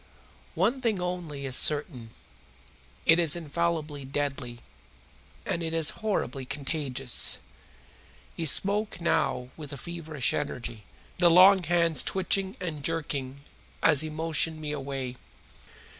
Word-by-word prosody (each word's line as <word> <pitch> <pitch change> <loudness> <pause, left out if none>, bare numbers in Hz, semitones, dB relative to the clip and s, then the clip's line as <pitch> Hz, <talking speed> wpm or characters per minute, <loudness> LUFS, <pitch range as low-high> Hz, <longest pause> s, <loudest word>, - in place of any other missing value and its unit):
One 225 +10 +1
thing 225 -6 +1
only 175 -6 -4
is 130 -1 +1
certain. 145 -6 +2 1.0
It 165 +1 +6
is 165 -3 +3
infallibly 160 -3 -2
deadly, 135 -3 -3 0.8
and 170 - -2
it 165 0 -2
is 160 -2 +3
horribly 200 -10 -1
contagious." 135 -2 -1 1.0
He 165 - -3
spoke 205 +5 +1
now 125 -6 0
with 150 -3 -9
a 140 - -6
feverish 160 -4 -2
energy, 115 -4 -4 0.3
the 175 -1 +6
long 185 +3 +7
hands 170 -1 +3
twitching 190 0 0
and 155 -5 -5
jerking 140 -4 -3 0.4
as 150 -3 +5
he 155 - -3
motioned 160 0 -1
me 150 -1 -4
away. 135 -3 -4
155 Hz, 120 wpm, -28 LUFS, 140-170 Hz, 1.0 s, long